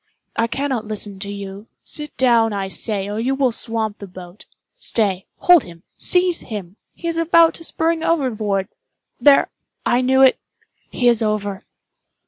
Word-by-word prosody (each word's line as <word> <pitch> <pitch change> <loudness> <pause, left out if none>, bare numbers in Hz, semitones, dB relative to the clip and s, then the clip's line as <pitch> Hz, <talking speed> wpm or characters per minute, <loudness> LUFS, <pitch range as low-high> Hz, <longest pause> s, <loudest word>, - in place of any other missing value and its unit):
I 230 - +1
cannot 260 -3 -3
listen 205 -2 -5
to 200 0 -4
you. 200 +1 -8 0.2
Sit 300 -1 -6
down, 230 -4 +3
I 195 -1 -3
say, 200 -1 -2
or 205 +1 -4
you 260 +4 0
will 265 -2 +2
swamp 225 -2 -3
the 200 - -8
boat. 180 +1 -13 0.3
Stay—hold 220 - +2
him—seize 340 - +1
him!—he 210 - -9
is 335 -1 -2
about 330 0 +4
to 330 - -8
spring 325 0 0
overboard! 215 - 0 0.5
There—I 275 -3 +2
knew 265 +1 +4
it—he 255 -1 -1
is 235 -1 +4
over!" 205 -2 -2
225 Hz, 135 wpm, -20 LUFS, 200-275 Hz, 0.5 s, about